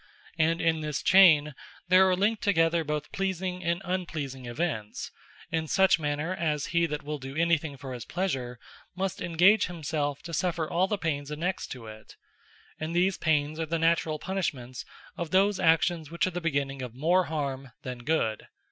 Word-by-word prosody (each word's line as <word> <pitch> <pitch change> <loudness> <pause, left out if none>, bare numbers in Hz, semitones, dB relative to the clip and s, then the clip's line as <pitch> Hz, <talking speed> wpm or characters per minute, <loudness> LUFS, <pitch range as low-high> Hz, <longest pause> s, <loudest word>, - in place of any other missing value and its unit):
And 165 +2 +3
in 160 -1 +1
this 150 -2 -3
Chayn, 160 -6 +6 0.3
there 185 +1 +6
are 185 - +3
linked 205 +4 +1
together 165 -4 +2
both 150 -1 -3
pleasing 185 -1 -2
and 170 +1 -1
unpleasing 155 -8 -4
events; 120 -5 -3 0.4
in 160 -1 -1
such 190 +1 +4
manner, 150 +3 -2
as 155 -5 -1
he 170 0 +3
that 150 -1 -4
will 150 0 -4
do 135 +1 -8
any 170 +1 +4
thing 145 -3 -7
for 130 0 -7
his 120 -2 -6
pleasure, 130 -10 -3 0.4
must 190 0 -3
engage 180 +5 +4
himselfe 150 -4 -3
to 170 - -8
suffer 170 0 0
all 180 +4 +1
the 210 - -1
pains 145 -5 -2
annexed 170 +5 -3
to 125 -3 -10
it; 110 0 -12 0.6
and 160 +2 -4
these 185 +2 +2
pains, 155 -1 +1
are 160 - -2
the 165 +2 0
Naturall 165 -1 +1
Punishments 140 -10 -4 0.3
of 170 -2 -3
those 195 +2 +3
actions, 165 -2 +2
which 170 +1 0
are 185 - -2
the 180 0 -4
beginning 140 -4 -1
of 125 -2 -6
more 175 +7 +3
Harme 140 -4 -4
that 125 -1 -6
Good. 120 -7 0
160 Hz, 180 wpm, -28 LUFS, 145-180 Hz, 0.6 s, Chayn